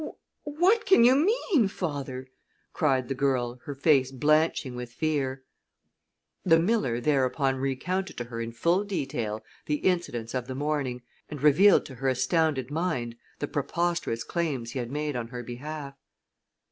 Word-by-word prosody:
"What 360 +10 +2
can 380 -11 +6
you 245 +2 +7
mean, 330 - +2
father?" 140 -9 -4 0.5
cried 135 -4 +1
the 135 - -1
girl, 125 -3 0
her 145 - -5
face 135 -2 +3
blanching 150 0 +2
with 125 -1 -6
fear. 135 -2 -2 1.0
The 165 -3 +5
miller 165 - +1
thereupon 135 0 +1
recounted 140 +9 -2
to 120 - -2
her 115 -1 -6
in 115 0 -4
full 170 - +1
detail 125 - -3 0.2
the 150 - +1
incidents 150 -10 -1
of 125 -2 -3
the 130 - -5
morning, 140 -4 -2 0.3
and 145 -3 -7
revealed 180 +7 +6
to 135 - -9
her 135 +1 -2
astounded 135 0 +1
mind 150 -8 -2 0.2
the 145 - -3
preposterous 150 -5 -1
claims 140 -9 -2
he 135 - -4
had 120 -1 -4
made 150 +1 -3
on 120 -2 -3
her 120 0 -7
behalf. 140 +4 -7
140 Hz, 150 wpm, -27 LUFS, 125-165 Hz, 1.0 s, you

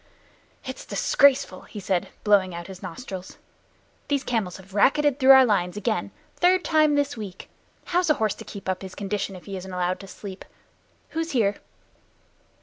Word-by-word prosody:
"It's - - -6
disgraceful," 265 -9 +3
he 210 - -9
said, 185 -2 -1 0.2
blowing 195 -4 +3
out 170 0 -6
his 190 0 -10
nostrils. 190 -7 -7 0.7
"Those 280 -2 0
camels 215 -7 -2
have 190 0 -15
racketed 285 +6 +3
through 265 -1 +3
our 265 -1 +8
lines 195 -4 0
again 210 - -1 0.2
the - - -29
third 360 +1 +4
time 310 -2 +4
this 285 0 0
week. 200 -5 -8 0.3
How's 355 -1 +1
a 305 - +5
horse 215 -4 0
to - - -10
keep 200 -3 -9
his 190 -1 -8
condition 200 -1 -3
if 180 - -12
he 195 -2 -5
isn't 190 +1 -8
allowed 180 0 -1
to 195 - -10
sleep. 190 0 -9 0.7
Who's 325 -1 -3
here?" 205 -5 +2
205 Hz, 170 wpm, -25 LUFS, 190-280 Hz, 0.7 s, our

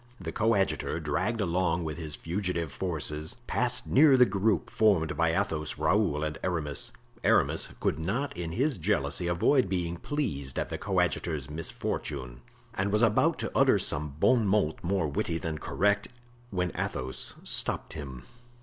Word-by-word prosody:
The 85 -4 -5
coadjutor, 100 -5 +1
dragged 90 +9 -1
along 90 -2 +1
with 80 +1 -4
his 75 -3 -5
fugitive 85 -3 -2
forces, 75 -3 -3
passed - - 0
near 140 -1 +6
the 125 - +7
group 100 - 0
formed 95 -8 +3
by 85 0 +2
Athos, 75 -2 -2
Raoul 80 -1 +2
and 75 0 -3
Aramis. 80 -6 -2 0.3
Aramis - - +3
could 75 - 0
not 110 - -2
in 85 -2 -4
his 130 - 0
jealousy 85 -2 0
avoid 95 +7 +3
being 85 -2 -1
pleased 70 - -3
at - - -1
the - - -4
coadjutor's 75 -5 -1
misfortune, 70 -5 -4 0.3
and 100 +1 -1
was 105 +3 +3
about 110 -2 +3
to - - -3
utter - - +5
some 75 -1 -2
bon 120 -1 +4
mot 95 -6 +1
more 90 -2 +1
witty 80 +3 -1
than 80 -2 -4
correct, 100 +2 +1 0.4
when 90 -4 -1
Athos 65 +1 -3
stopped - - 0
him. 65 -5 -7
85 Hz, 150 wpm, -29 LUFS, 75-100 Hz, 0.4 s, the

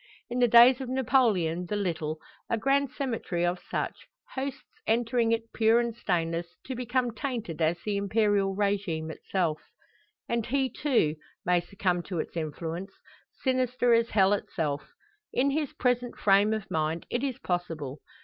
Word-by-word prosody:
In 245 - -1
the 245 - +5
days 240 +3 +7
of 260 - -5
Napoleon 220 -10 +2
the 210 - -2
Little, 160 -6 -2 0.3
a 230 - +1
grand 275 +4 +2
cemetery 225 -11 -2
of 175 +1 0
such; - - -3 0.3
hosts 270 0 -4 0.2
entering 230 0 +2
it 230 0 -1
pure 225 +1 +4
and 235 -1 -1
stainless, 170 -4 -1
to 260 - -4
become 250 0 0
tainted 230 - -4
as 165 +2 +2
the 210 -2 -1
Imperial 200 -1 +2
regime 195 -6 -1
itself. 165 -2 -1 0.7
And 235 -2 -1
he, 265 -1 +1
too, 225 - +1 0.3
may 180 0 +3
succumb 180 -1 -1
to 185 - -3
its 160 - -4
influence, 165 +4 -4 0.5
sinister 255 -2 +2
as 230 0 +3
hell 195 -1 +4
itself. 155 -7 -2 0.4
In 275 +3 +2
his 295 -1 -1
present 245 -1 0
frame 200 +1 +4
of 220 -2 -3
mind 160 +1 -1
it 240 +2 -1
is 265 -3 -1
possible. 165 - -3
210 Hz, 155 wpm, -28 LUFS, 175-245 Hz, 0.7 s, days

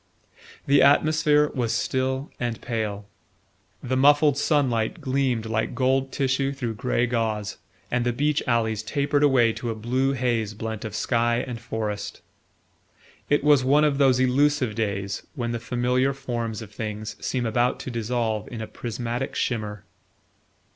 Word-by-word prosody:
The 140 +1 +5
atmosphere 150 +1 +4
was 120 -3 -1
still 130 +2 -1
and 120 -2 -2
pale. 105 -3 -3 0.8
The 130 +1 -1
muffled 145 +2 +5
sunlight 140 -1 +1
gleamed 130 -5 0
like 110 0 -1
gold 135 0 +1
tissue 135 0 0
through 120 -4 -3
grey 125 +1 0
gauze, 110 -3 -2 0.3
and 120 0 +1
the 120 - +1
beech 145 +4 +1
alleys 110 -3 +1
tapered 140 +5 0
away 130 -6 +4
to 120 - -5
a 115 - -2
blue 130 +5 0
haze 115 -5 -1
blent 110 0 -5
of 105 -1 -5
sky 120 +1 +1
and 125 -3 -6
forest. 110 -3 -4 1.1
It 145 - +2
was 145 -3 +5
one 145 +4 +4
of 145 -2 +2
those 130 -3 +4
elusive 130 -1 +2
days 100 -2 -2
when 120 -4 -2
the 120 - -2
familiar 125 +3 0
forms 120 -5 -4
of 105 - -12
things 105 0 -5
seem 125 -2 -1
about 120 +2 +1
to 130 - -6
dissolve 115 -2 -1
in 120 - -6
a 110 - -3
prismatic 120 +3 -4
shimmer. 105 -5 -2
120 Hz, 150 wpm, -25 LUFS, 110-135 Hz, 1.1 s, The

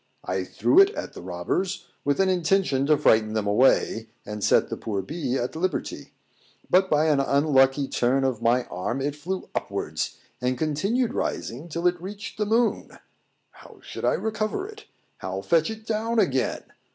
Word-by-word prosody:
I - - -2
threw - - +3
it 390 0 +8
at - - -5
the - - -9
robbers, 190 -2 -3 0.2
with 145 +4 0
an 195 - +4
intention 180 -6 +1
to 150 -1 +5
frighten 110 -6 +3
them 110 -2 -1
away, 110 0 +2 0.2
and 105 0 -6
set - - +3
the - - -3
poor 100 -3 -3
bee 135 - -2
at 125 +4 -3
liberty; 180 +3 -3 0.6
but, 190 +1 +4
by 150 +1 +3
an 150 -3 +3
unlucky 135 -1 +3
turn 130 +2 +1
of 130 -4 -1
my 120 +2 +3
arm, 105 +8 -4
it 145 +2 -2
flew 180 +6 -5
upwards, - - -3 0.2
and 125 0 0
continued 195 - 0
rising 140 +9 -3
till 170 +2 -4
it 175 -1 +2
reached 200 +3 -8
the 210 - 0
moon. 230 +2 0 0.5
How - - -16
should - - -8
I - - +3
recover 220 - -2
it? 430 0 -12 0.3
how 95 +1 -4
fetch 165 -2 +2
it 220 0 -7
down 225 +1 -1
again? 135 - +1
150 Hz, 175 wpm, -25 LUFS, 130-195 Hz, 0.6 s, it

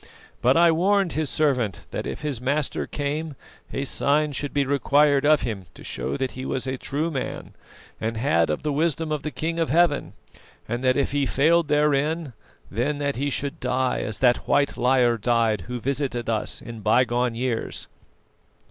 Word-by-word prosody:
But 130 +4 +4
I 170 0 +6
warned 190 +2 +2
his 155 -2 -1
servant 125 - 0
that - - -4
if - - -5
his 145 -6 -3
master 140 +3 -1
came, 150 +1 -3 0.4
a 135 - -2
sign 150 +2 +1
should 145 +1 -3
be 140 -1 +1
required 140 +1 +3
of 155 -1 +5
him 100 -7 -4
to - - -12
show - - -3
that 130 -2 -2
he 130 - -7
was 130 -1 -3
a 130 0 -2
true 150 +5 -2
man, 135 -4 -5 0.5
and 110 +1 -2
had 85 - +2
of 75 - -2
the 150 -1 -1
wisdom 160 +1 0
of 150 -2 -1
the 155 - -3
King 160 +4 -3
of 165 - 0
Heaven; 170 -3 +2 0.5
and 120 +3 -3
that 130 -1 +3
if 140 - +1
he 140 -1 +1
failed 165 +5 +3
therein, 150 0 +1 0.4
then 125 +8 -1
that 140 -3 -2
he 140 +2 0
should 140 +3 -2
die 130 0 0
as 110 - -2
that 125 -2 +3
white 140 - +2
liar 125 -2 +3
died 115 -2 +1
who 125 0 -4
visited 130 -2 -2
us 110 -1 -2
in 115 -1 -8
bygone 120 +2 +2
years. 120 -1 -2
140 Hz, 185 wpm, -24 LUFS, 125-150 Hz, 0.5 s, I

